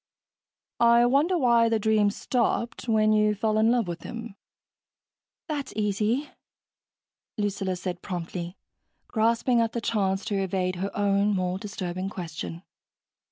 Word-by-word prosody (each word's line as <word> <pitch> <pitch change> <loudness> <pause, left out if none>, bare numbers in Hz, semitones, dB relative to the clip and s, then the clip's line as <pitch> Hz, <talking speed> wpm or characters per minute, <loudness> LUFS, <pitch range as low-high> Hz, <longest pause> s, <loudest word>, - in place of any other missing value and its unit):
"I 235 0 +6
wonder 290 +9 +3
why 235 -5 +4
the 225 - +2
dream 215 -1 +3
stopped 235 +2 -1
when 215 -1 +4
you 210 0 +3
fell 215 +1 +1
in 220 +1 +4
love 235 -4 +2
with 170 -1 -5
him." 230 -2 -7 1.1
"That's 295 -4 -4
easy," 215 +6 0 1.1
Lucilla 200 -2 -1
said 180 0 -5
promptly, 175 0 -5 0.5
grasping 230 +2 +2
at 230 -1 0
the 235 - -1
chance 195 -4 0
to 200 -3 -1
evade 185 -1 -1
her 195 +2 -2
own 200 0 +2
more 185 0 -1
disturbing 185 -2 -4
question. 170 -2 -6
210 Hz, 130 wpm, -26 LUFS, 190-230 Hz, 1.1 s, I